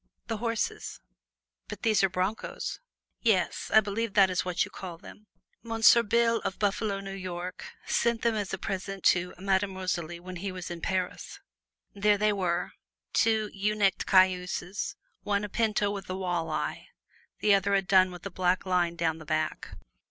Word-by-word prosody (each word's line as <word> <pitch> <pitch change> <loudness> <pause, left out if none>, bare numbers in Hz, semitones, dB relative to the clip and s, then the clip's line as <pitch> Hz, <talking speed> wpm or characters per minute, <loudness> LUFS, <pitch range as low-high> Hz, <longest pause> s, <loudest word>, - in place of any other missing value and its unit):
"The 225 - -3
horses." 230 0 -2 0.7
"But - - -8
these 215 -3 +3
are 195 - +4
broncos." 185 +4 -3 0.4
"Yes; 220 -6 +1
I 220 - +7
believe 210 +1 -3
that 195 -2 +6
is 180 - 0
what 180 -1 0
you - - -13
call 180 -3 -7
them. 210 +5 -14 0.3
Monsieur 225 0 +5
Bill 230 +1 +2
of 190 - -4
Buffalo, 205 0 0
New 195 0 -6
York, 185 -1 -6 0.2
sent 235 -1 +1
them 235 -1 +3
as 210 -3 -2
a 190 - -2
present 195 +1 -4
to 180 0 +3
Madame 195 +1 0
Rosalie 175 -2 -3
when 180 +1 -8
he 195 +2 -4
was 180 -1 -6
in 170 -1 -6
Paris." 185 -2 -3 0.5
There 205 +1 +3
they 210 +1 +2
were 180 -3 -1 0.4
two 220 -2 +2
ewe 205 +2 0
necked 195 -3 +1
cayuses 185 0 +2 0.3
one 200 0 0
a 210 - -4
pinto 210 -2 +1
with 195 -2 -6
a 185 - -3
wall 175 -3 -2
eye; - - -3 0.5
the 210 - +4
other 200 0 +3
a 195 - +2
dun 185 -1 +5
with 180 0 -10
a 200 - -4
black 180 +1 +1
line 175 -2 +1
down 165 -1 -1
the - - -9
back. 155 +1 -2
195 Hz, 175 wpm, -28 LUFS, 180-210 Hz, 0.7 s, I